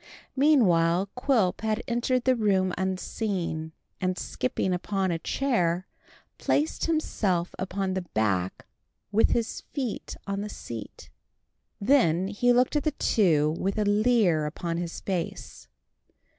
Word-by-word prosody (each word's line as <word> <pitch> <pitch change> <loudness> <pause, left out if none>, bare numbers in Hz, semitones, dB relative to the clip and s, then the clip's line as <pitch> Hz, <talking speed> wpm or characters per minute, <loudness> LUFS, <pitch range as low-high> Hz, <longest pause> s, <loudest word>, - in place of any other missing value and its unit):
Meanwhile 195 - +4
Quilp 245 -9 +1
had 220 0 -1
entered 240 +1 0
the 260 0 +3
room 190 -5 +2
unseen, 185 -3 -2 0.3
and 185 0 -1
skipping 180 +8 -2
upon 190 +1 -1
a 165 - -1
chair, 185 -7 0 0.5
placed 300 +2 0
himself 200 - 0
upon 190 0 -2
the 190 - -1
back 100 - -1 0.5
with 215 +2 +4
his 230 -2 -1
feet 260 -7 -3
on 200 0 -2
the 210 - -4
seat. 115 - -8 0.7
Then 195 - +3
he 245 +4 +2
looked 250 +4 +3
at 295 - +2
the 310 - 0
two 160 - +2
with 195 +2 -1
a 210 - +1
leer 205 -7 +3
upon 165 +2 -3
his 170 -1 -4
face. 185 -4 -4
195 Hz, 130 wpm, -27 LUFS, 175-235 Hz, 0.7 s, Meanwhile